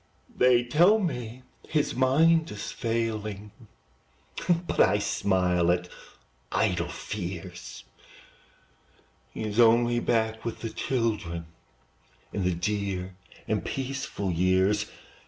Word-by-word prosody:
They 125 -1 +4
tell 170 - +5
me 125 - -4 0.2
his 150 -2 0
mind 155 +6 +3
is 105 -1 -6
failing, 110 -3 -3 1.1
But - - -3
I 100 +2 +5
smile 90 -4 +1
at 90 0 -1 0.6
idle - - +1
fears; 90 -3 -6 1.5
He - - -6
is 105 +1 -2
only 120 +1 +5
back 110 -1 0
with 115 - -5
the 115 - -4
children, 105 -12 -2 0.9
In 100 - -1
the 90 -1 +1
dear 95 0 -2 0.3
and - - 0
peaceful 135 -7 -3
years. 95 +4 +2
110 Hz, 100 wpm, -27 LUFS, 95-120 Hz, 1.5 s, tell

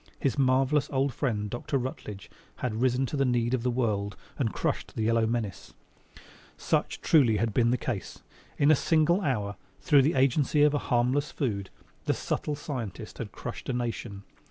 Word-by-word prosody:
His 135 -5 0
marvelous 135 +2 +2
old 135 -1 0
friend, 110 -5 -1
Dr. 120 +5 -2
Rutledge, 105 -6 -6 0.2
had 115 -2 -3
risen 130 +1 +2
to 140 - -4
the 140 - +2
need 120 -2 +1
of 130 - +1
the 125 - 0
world 105 -5 -1 0.2
and 115 -6 +1
crushed - - -2
the 110 - -1
yellow 115 0 +2
menace. 110 -4 -3 0.8
Such, - - -1
truly, 125 -9 +4
had 110 0 0
been 120 0 +3
the 125 - +2
case. 115 -7 -5 0.3
In 145 +1 +5
a - - +7
single 160 +6 +3
hour, 105 - -1 0.2
through 145 -3 +5
the 145 +4 +2
agency 140 +3 +3
of 150 0 +5
a 145 - +1
harmless 125 +4 +2
food, 100 -8 -2 0.4
the - - +1
subtle 150 - -2
scientist 130 - -6
had - - -5
crushed - - -7
a - - 0
nation. 115 -4 -4
125 Hz, 180 wpm, -28 LUFS, 110-140 Hz, 0.8 s, a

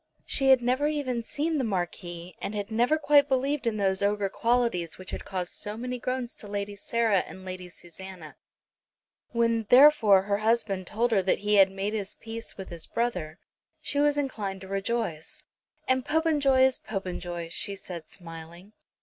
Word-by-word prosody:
She 270 -1 +1
had 260 -2 +6
never 255 +4 +2
even 280 -6 -1
seen 300 +6 -1
the - - 0
Marquis, 175 -3 -4
and 210 - -4
had 205 +1 -4
never 240 +7 +3
quite 290 -2 +4
believed 270 0 0
in 220 -2 0
those 190 -1 +1
ogre 200 0 +1
qualities 230 -7 0
which 185 - -9
had - - -6
caused 180 -2 -3
so 210 +1 -5
many 250 +1 -4
groans 255 0 -3
to 210 - -8
Lady 205 0 -4
Sarah 220 0 +1
and 190 +1 -8
Lady 185 -1 -6
Susanna. 175 -1 -10 1.0
When, 230 -2 +1
therefore, 245 -8 +7
her 200 0 0
husband 215 -4 0
told 235 +3 0
her 200 -4 +4
that 185 - +2
he 210 - +2
had 195 -1 +7
made 195 +2 -3
his 205 -2 -3
peace 225 0 -8
with 190 - -7
his 170 -2 -8
brother 180 -10 -2 0.4
she 285 - -2
was 290 0 +3
inclined 210 -9 -3
to 190 - -9
rejoice. 195 - -3 0.4
"And 260 0 +2
Popenjoy 290 -3 +3
is 260 0 +3
Popenjoy," 175 -4 -5
she 200 +3 -2
said 170 -4 -8
smiling. 170 +3 -11
210 Hz, 175 wpm, -27 LUFS, 190-255 Hz, 1.0 s, therefore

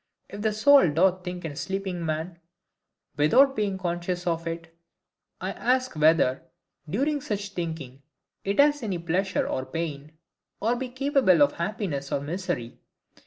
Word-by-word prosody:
If 205 - -7
the 220 0 +1
soul 270 - +6
doth 185 +4 +2
think 180 -1 -6
in 160 - -3
a - - -10
sleeping 185 +3 -3
man 160 +2 -3 0.8
without 260 - +5
being 200 -3 -1
conscious 175 0 -3
of 165 -1 -1
it, 165 0 -6 0.6
I - - -3
ask 255 -3 0
whether, 155 -4 +3 0.5
during 280 - 0
such 205 -4 -3
thinking, 160 -8 -5 0.4
it 200 +4 -2
has 290 0 +5
any 200 -6 -2
pleasure 180 +3 -1
or 130 - -2
pain, 155 -1 -5 0.5
or 230 +4 +1
be 255 +1 -4
capable 260 - +3
of 145 - +3
happiness 170 -7 -3
or - - +1
misery? 150 -5 -4
180 Hz, 150 wpm, -26 LUFS, 160-215 Hz, 0.8 s, soul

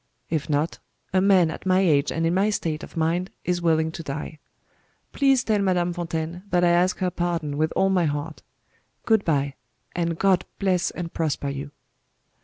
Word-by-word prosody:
If 155 -3 -1
not, 150 +2 0 0.3
a 185 - +4
man 185 -4 +4
at 185 - -7
my 185 0 +4
age 150 -6 +3
and 165 0 -1
in 165 - +2
my 195 +3 +2
state 165 -7 -2
of - - -10
mind 170 +3 0 0.2
is 175 -1 0
willing 160 -1 +2
to 165 - -7
die. 150 +1 -6 0.7
Please 270 -3 +3
tell 215 -3 +1
Madame 180 -3 +1
Fontaine 170 0 -4
that 180 -2 +2
I 175 - +5
ask 175 +2 +3
her 185 -1 -1
pardon 170 -4 -2
with 155 +2 0
all 195 0 +3
my 180 -3 +3
heart. 150 +1 -3 0.6
Good 220 -3 +3
bye 140 -3 0 0.4
and 170 -1 -1
God 185 -1 +3
bless 185 -3 +1
and 170 -2 -6
prosper 150 -3 -1
you." 140 +1 -5
170 Hz, 185 wpm, -24 LUFS, 160-185 Hz, 0.7 s, I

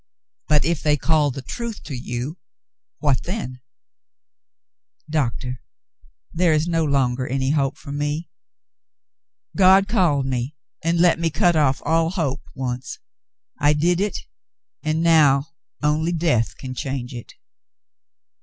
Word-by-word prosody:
But 150 -2 +3
if 170 -1 0
they 150 -1 +2
called 150 -3 +2
the 135 - -6
truth 235 - -6
to 145 - -7
you 125 +6 -5 0.3
— - - -69
what 140 -4 +3
then? 170 - -5 0.7
" - - -40
Doctah, 125 -2 -1 0.7
there 170 -1 +3
is 155 +2 +1
no 165 -1 +1
longer 130 -3 +1
any 135 +1 0
hope 140 -2 0
for 140 - -9
me. 145 +3 -2 1.3
God 190 0 +6
called 175 - +2
me 130 +2 -2 0.3
and 165 +1 +1
let 175 -1 +4
me 165 -1 +1
cut 170 +3 +2
off 145 -3 +2
all 165 0 +2
hope, 160 -7 -2
once. 125 -1 -4 0.6
I 145 +1 +4
did 170 +4 +2
it, 205 0 -1 0.6
and 155 +1 0
now, 150 -3 +4 0.3
only 155 +3 +1
death 155 -9 +1
can 130 -1 -6
change 130 -1 -4
it." 120 -2 -9
150 Hz, 135 wpm, -22 LUFS, 135-165 Hz, 1.3 s, God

